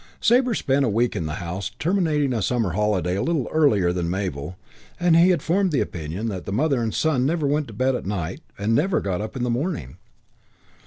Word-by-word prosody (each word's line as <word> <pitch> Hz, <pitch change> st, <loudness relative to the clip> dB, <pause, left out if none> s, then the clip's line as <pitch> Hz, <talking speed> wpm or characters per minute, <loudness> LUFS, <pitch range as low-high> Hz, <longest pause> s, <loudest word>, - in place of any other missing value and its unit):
Sabre 245 Hz, +2 st, +4 dB
once 230 Hz, -, 0 dB
spent 135 Hz, +1 st, +1 dB
a 125 Hz, -, +2 dB
week 115 Hz, +3 st, +1 dB
in 80 Hz, -, -2 dB
the 75 Hz, -, -4 dB
house, 90 Hz, +4 st, -4 dB
terminating 155 Hz, -6 st, +1 dB
a 115 Hz, -, -1 dB
summer 115 Hz, -2 st, 0 dB
holiday 95 Hz, -2 st, 0 dB
a -, -, -1 dB
little 165 Hz, -7 st, 0 dB
earlier 105 Hz, -, +3 dB
than 85 Hz, -2 st, -2 dB
Mabel, 90 Hz, -3 st, -3 dB, 0.4 s
and 175 Hz, -2 st, +4 dB
he 170 Hz, +2 st, +6 dB
had 175 Hz, -6 st, +1 dB
formed 190 Hz, +2 st, +1 dB
the 140 Hz, -, +1 dB
opinion 85 Hz, +6 st, -3 dB
that 95 Hz, -3 st, -4 dB
mother 135 Hz, +3 st, +1 dB
and 115 Hz, -1 st, -1 dB
son 150 Hz, -2 st, +1 dB
never 155 Hz, +2 st, 0 dB
went 145 Hz, +1 st, 0 dB
to 115 Hz, -, -10 dB
bed 130 Hz, +5 st, +1 dB
at 125 Hz, -, -4 dB
night 90 Hz, -4 st, -3 dB, 0.2 s
and 105 Hz, +3 st, 0 dB
never 175 Hz, +10 st, +2 dB
got 95 Hz, -1 st, -2 dB
up 110 Hz, -, -6 dB
in 125 Hz, -, -2 dB
the 125 Hz, -, 0 dB
morning. 120 Hz, -, -3 dB
120 Hz, 220 wpm, -23 LUFS, 95-155 Hz, 0.4 s, he